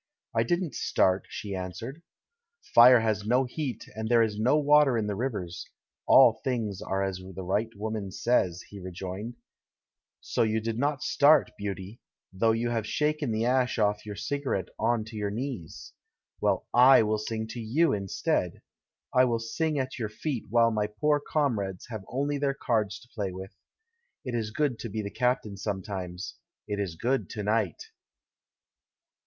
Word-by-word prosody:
"I 115 - +2
didn't 175 +7 0
start," 95 0 +1
she 105 -2 -6
answered. 95 - -6 0.7
"Fire 120 0 +9
has 110 -2 0
no 125 +5 +3
heat, 130 -2 -4
and 110 0 -3
there 120 -1 +5
is 105 -1 -2
no 125 +7 +3
water 145 -3 +5
in 110 - 0
the 105 - -2
rivers; 100 -7 -4 0.4
all 115 -4 +7
things 115 -7 -2
are 95 0 -1
as 95 -1 -2
the 95 0 -8
right 105 +5 0
woman 105 -1 -4
says," 95 -5 0
he 100 - -11
rejoined. 95 +5 -6 0.8
"So - - -2
you 110 0 +2
did 115 +1 -3
not 145 +1 0
start, 150 0 +4
beauty, 100 +1 -6 0.3
though 110 +4 +3
you 115 +1 0
have 115 -2 -1
shaken 150 -2 0
the 110 +1 0
ash 125 0 +2
of 105 -1 +1
your 105 -1 -7
cigarette 120 -4 -2
on 115 -1 +1
to 110 0 -10
your 105 -1 -2
knees! 115 - -6 0.5
Well, - - +1
/ - - -56 0.3
will 110 0 0
sing 110 0 -3
to 120 - -6
you 130 +10 +2
in 100 -2 -3
stead. - - -1 0.5
I 130 0 +6
will 120 -2 +1
sing 150 +7 -2
at 130 -1 -3
your 110 -3 -2
feet, 130 +2 -4
while 115 +1 +4
my 105 -1 0
poor 145 +8 +1
comrades 110 - -1
have 110 -4 -6
only 140 +3 -1
their 140 -1 0
cards 110 -5 -1
to 120 - -17
play 100 -6 -3
with. 95 +1 -9 0.7
It 125 - -4
is 115 -2 -1
good 130 +1 -1
to 115 - -5
be 110 +1 -3
the 100 - -5
captain 125 -4 0
sometimes 95 -3 -5
— - - -65
it 105 -1 -3
is 95 -5 -2
good 130 +10 -1
to 105 -3 -5
night." 105 -5 0
110 Hz, 175 wpm, -28 LUFS, 100-125 Hz, 0.8 s, Fire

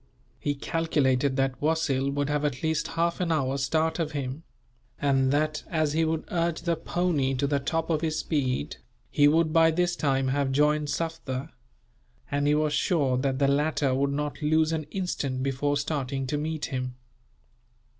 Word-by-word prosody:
He 145 - -1
calculated 140 -4 +1
that 135 -2 0
Wasil 145 -3 +1
would 140 0 -1
have 150 0 0
at 140 -2 -2
least 160 0 0
half 170 +1 +1
an 175 -2 0
hour's 135 -3 0
start 160 +4 0
of 160 -2 -2
him; 140 +1 -4 0.6
and 135 -2 +2
that, 150 +1 0
as 155 -3 0
he 160 +1 +2
would 160 0 -1
urge 170 -1 0
the 170 -1 +1
pony 160 -5 0
to 130 - 0
the 140 0 +1
top 165 +4 -1
of 155 -1 +1
his 160 -1 -1
speed, 135 -5 -1 0.3
he 145 -1 +5
would 155 +1 +3
by 165 0 +6
this 175 +2 +1
time 135 -4 +1
have 140 0 0
joined 150 +2 +2
Sufder; 160 -3 -3 0.8
and 145 0 +1
he 150 - +4
was 150 0 +1
sure 145 -9 +2
that 130 0 0
the 140 0 +2
latter 145 -1 +1
would 140 +2 +1
not 145 0 -3
lose 155 +1 +2
an 160 -2 -2
instant 140 -9 -2
before 140 +2 0
starting 140 -2 -2
to 145 +3 -1
meet 155 0 -2
him. 125 -2 -4
145 Hz, 175 wpm, -27 LUFS, 135-160 Hz, 0.8 s, by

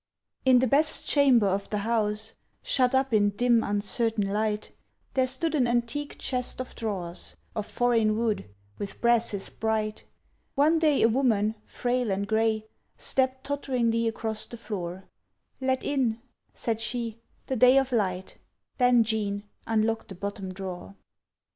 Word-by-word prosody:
In 260 -1 +6
the 250 - +3
best 295 +5 +2
chamber 270 -7 +5
of 195 +1 -1
the 210 - -1
house, 220 -1 0 0.3
Shut 255 0 +3
up 265 -2 +1
in 205 -1 +4
dim, 235 +3 +2
uncertain 205 +1 +1
light, 210 0 -1 0.4
There 260 -1 +2
stood 300 +5 +3
an 265 -5 +2
antique 240 +5 -2
chest 250 -1 -1
of 255 - -5
drawers, 185 -6 -3 0.2
Of 215 -2 -3
foreign 225 -3 +1
wood, 220 - -1 0.3
with 200 -1 -5
brasses 235 -4 +2
bright. 215 -1 -2 0.5
One 310 +4 +4
day 305 -3 +3
a - - +7
woman, 220 -4 +2
frail 245 -1 -1
and 200 +1 -1
gray, 220 0 +1 0.3
Stepped 260 0 0
totteringly 245 -5 0
across 220 -1 -2
the 235 - -9
floor 190 -5 -6 0.6
"Let 260 -1 0
in," 250 -6 0 0.3
said 225 -1 -3
she, 230 -1 -2 0.3
"the 265 - -2
light 255 +2 +6
of 270 -1 +2
day, 190 -5 -2 0.4
Then, 245 -2 +5
Jean, 210 -2 -1 0.2
unlock 225 0 0
the 190 - -9
bottom 200 +1 -5
drawer." 185 0 -7
225 Hz, 145 wpm, -27 LUFS, 210-255 Hz, 0.6 s, a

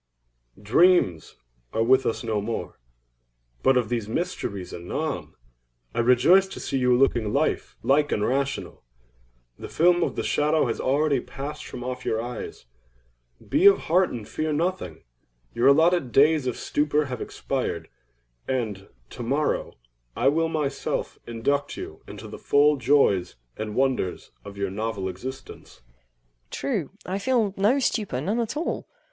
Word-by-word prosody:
Dreams 105 - +3 0.4
are 115 - +2
with 130 +3 +4
us 115 - -2
no 110 -3 -1
more; 115 +2 -5 0.8
but 135 -1 +4
of 120 -4 0
these 115 -3 -2
mysteries 105 - -3
anon. 140 - -4 0.6
I - - -2
rejoice 125 +11 +5
to 190 - -9
see 135 - -2
you 125 -1 +3
looking 120 -5 +2
life 145 +5 -1
like 145 +2 +3
and 105 - +1
rational. 140 +1 -2 0.8
The - - -7
film 175 +2 +3
of - - 0
the - - -2
shadow 150 +1 +2
has 115 - -2
already 140 +1 +2
passed 145 +4 -7
from 125 - -7
off 125 0 -5
your 110 - -1
eyes. 120 - -6 0.8
Be 340 +7 +5
of 400 - +6
heart 180 +2 +4
and 115 -4 -7
fear 155 0 -2
nothing. 175 +5 -2 0.5
Your 120 - +2
allotted 160 -1 +4
days 145 +1 +4
of 125 - -2
stupor 150 0 0
have 125 -3 -5
expired - - -3 0.6
and, 110 -7 -2 0.2
to - - -8
morrow, 140 +6 -1 0.4
I 135 - +3
will 165 +3 +1
myself 150 -4 -2
induct 140 +5 -1
you - - -8
into - - -9
the - - -9
full 150 +1 +4
joys 120 -9 +2 0.2
and 110 -1 -5
wonders 130 -9 -1
of 100 - -10
your 100 -1 -2
novel 105 -1 -3
existence. 125 - -8
EIROS. - - -35 0.6
True—I 190 +2 -3
feel 220 -3 +1
no 210 +8 +3
stupor—none 210 - -1
at 235 +4 -2
all. 325 - -3
135 Hz, 145 wpm, -25 LUFS, 115-155 Hz, 0.8 s, of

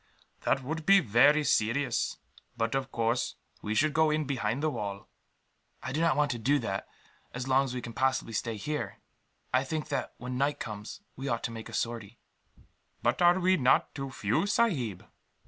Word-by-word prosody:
"That 135 - +2
would 160 +4 -4
be 195 0 +8
very 145 - +5
serious; 130 -1 +1 0.4
but 115 +1 0
of 135 0 -2
course 115 +1 0 0.3
we 105 +1 -2
should 155 +4 +3
go 160 +1 +4
in 155 0 +1
behind 130 0 -1
the 155 - +2
wall." 100 -5 -5 0.8
"I 130 - -4
do 150 +4 -1
not 165 -1 +3
want 145 0 +2
to 120 - -3
do 140 +6 +3
that, 95 -7 -3 0.5
as 125 +1 -4
long 135 +1 +4
as 130 -1 -5
we 125 - -4
can 120 - -7
possibly 130 -2 0
stay 115 0 -2
here. 150 +9 -3 0.6
I 130 +1 +4
think 150 +2 -4
that, 140 - -3
when 125 +1 -5
night 140 +2 +1
comes, 105 -2 -6
we 135 +2 -5
ought 115 -3 -1
to - - -2
make 115 0 -8
a - - -11
sortie." 115 -1 -3 0.9
"But - - +1
are 175 +1 +6
we 185 +1 +3
not 130 -3 +3
too 135 -1 -5
few, 120 - 0
sahib?" 145 - 0
130 Hz, 190 wpm, -29 LUFS, 115-150 Hz, 0.9 s, be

